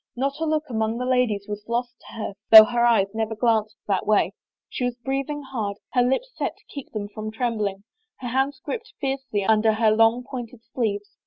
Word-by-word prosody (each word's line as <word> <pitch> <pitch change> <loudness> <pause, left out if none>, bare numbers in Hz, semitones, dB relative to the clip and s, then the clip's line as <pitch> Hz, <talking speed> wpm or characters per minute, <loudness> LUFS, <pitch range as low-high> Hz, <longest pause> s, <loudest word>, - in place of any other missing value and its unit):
Not 275 +4 -2
a 325 - -1
look 310 0 +1
among 220 -2 -1
the 250 - -3
ladies 250 -6 +1
was 210 0 -5
lost 240 +1 -1
to - - -12
her 215 -2 -4 0.2
though 220 -1 +12
her 240 +2 0
eyes 220 -5 +3
never 220 0 -2
glanced 220 -1 +1
that 195 -2 0
way. 215 -1 +3 0.3
She - - -5
was 245 -1 -1
breathing 275 +4 -3
hard, 220 -7 -4 0.2
her 250 - +4
lips 265 - 0
set - - -3
to - - -27
keep 280 -3 -9
them 210 -2 -4
from 215 +1 -6
trembling, 215 -4 -2 0.4
her 245 - -5
hands 270 +3 0
gripped 465 -1 -5
fiercely 270 -7 -2
under 220 +1 +3
her 220 0 +3
long 225 +3 +3
pointed 245 -3 -8
sleeves. 205 -4 -2
235 Hz, 200 wpm, -24 LUFS, 215-260 Hz, 0.4 s, though